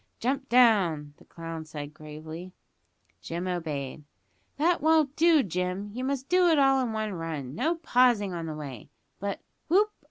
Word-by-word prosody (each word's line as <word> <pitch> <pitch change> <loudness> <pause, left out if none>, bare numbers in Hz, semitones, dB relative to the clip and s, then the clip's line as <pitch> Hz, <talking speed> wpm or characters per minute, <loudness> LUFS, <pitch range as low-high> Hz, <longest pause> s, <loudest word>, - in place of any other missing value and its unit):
"Jump 270 +3 -1
down," 190 -12 +4
said - - -21
the - - -32
clown 165 -1 -6 0.3
gravely. 155 +4 -9 0.7
Jim 170 - -4
obeyed. 155 -5 -4 0.5
"That 335 +4 +2
won't 310 -2 +3
do, 325 -3 +5
Jim. 180 +2 -3
You 250 +3 -4
must 270 0 -2
do 360 0 +4
it 325 -2 +4
all 270 -1 +4
in 245 -3 -1
one 215 -1 -2
run; 160 -6 -5
no 310 - 0
pausing 245 - +2
on 165 -1 -4
the 155 - -4
way 140 -7 -8 0.3
but, 200 +1 -4 0.3
whoop! 410 +6 +3
200 Hz, 160 wpm, -28 LUFS, 165-275 Hz, 0.7 s, do